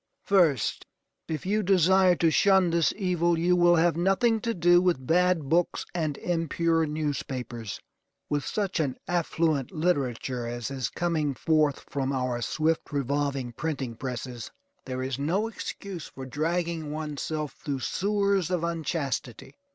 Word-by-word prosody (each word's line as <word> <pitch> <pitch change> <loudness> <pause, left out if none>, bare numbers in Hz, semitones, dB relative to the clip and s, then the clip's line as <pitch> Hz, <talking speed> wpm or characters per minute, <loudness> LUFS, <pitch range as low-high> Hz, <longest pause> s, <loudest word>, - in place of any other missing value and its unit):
First, 170 - +2 0.4
if 155 0 -4
you 210 +3 +1
desire 190 -1 +4
to 165 -1 +2
shun 190 0 +4
this 170 -1 +3
evil, 175 -4 +1
you 175 +2 +3
will 175 0 +5
have 170 0 +3
nothing 205 +6 +2
to 230 -1 -1
do 175 0 +5
with 175 -8 +1
bad 175 -1 +2
books 170 +4 +1
and 155 -5 -1
impure 165 -1 0
newspapers. 130 -7 -4 0.5
With 145 -1 -1
such 200 -4 -2
an 140 -5 -1
affluent 160 -5 0
literature 130 -7 -1
as 120 +1 -4
is 130 -2 -2
coming 160 -5 -1
forth 155 -1 +1
from 135 -1 -2
our 125 -2 -1
swift 155 +6 0
revolving 140 -2 -1
printing 135 -2 -3
presses, 125 -1 -5 0.4
there 130 0 -3
is 130 0 -3
no 180 +10 0
excuse 200 -5 -6
for 135 - -9
dragging 160 +3 -2
one's 150 -2 -4
self 155 -3 -3
through 140 -3 -4
sewers 200 -1 +1
of 180 -2 -1
unchastity. 155 -6 -3
160 Hz, 145 wpm, -27 LUFS, 135-175 Hz, 0.5 s, will